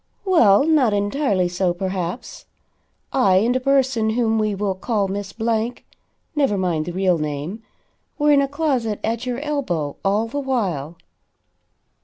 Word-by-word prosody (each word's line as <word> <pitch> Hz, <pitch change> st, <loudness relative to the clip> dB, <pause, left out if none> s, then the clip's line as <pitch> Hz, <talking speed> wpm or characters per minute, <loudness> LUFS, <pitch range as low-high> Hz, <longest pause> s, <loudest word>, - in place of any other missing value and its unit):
"Well, 275 Hz, -, +5 dB
not 290 Hz, -9 st, +3 dB
entirely 205 Hz, -2 st, +1 dB
so, 175 Hz, 0 st, -1 dB
perhaps. 185 Hz, +2 st, -4 dB, 0.7 s
I 200 Hz, -9 st, +4 dB
and 230 Hz, +6 st, +3 dB
a -, -, +2 dB
person 260 Hz, -4 st, +2 dB
whom 225 Hz, -1 st, +1 dB
we 215 Hz, -1 st, 0 dB
will 195 Hz, 0 st, -1 dB
call 200 Hz, +1 st, -1 dB
Miss 195 Hz, 0 st, -4 dB
Blank 225 Hz, +2 st, -2 dB, 0.5 s
(never 275 Hz, -9 st, +2 dB
mind 175 Hz, -5 st, 0 dB
the -, -, -2 dB
real 185 Hz, -1 st, +1 dB
name,) 150 Hz, +8 st, -4 dB, 0.6 s
were 295 Hz, -1 st, +3 dB
in 285 Hz, -1 st, +5 dB
a 275 Hz, -, +1 dB
closet 270 Hz, -7 st, -1 dB
at 230 Hz, +3 st, -2 dB
your 245 Hz, -1 st, -2 dB
elbow 195 Hz, -, -2 dB
all 205 Hz, +3 st, +1 dB
the 285 Hz, +5 st, -4 dB
while." 190 Hz, -, -2 dB
215 Hz, 150 wpm, -21 LUFS, 185-260 Hz, 0.7 s, Well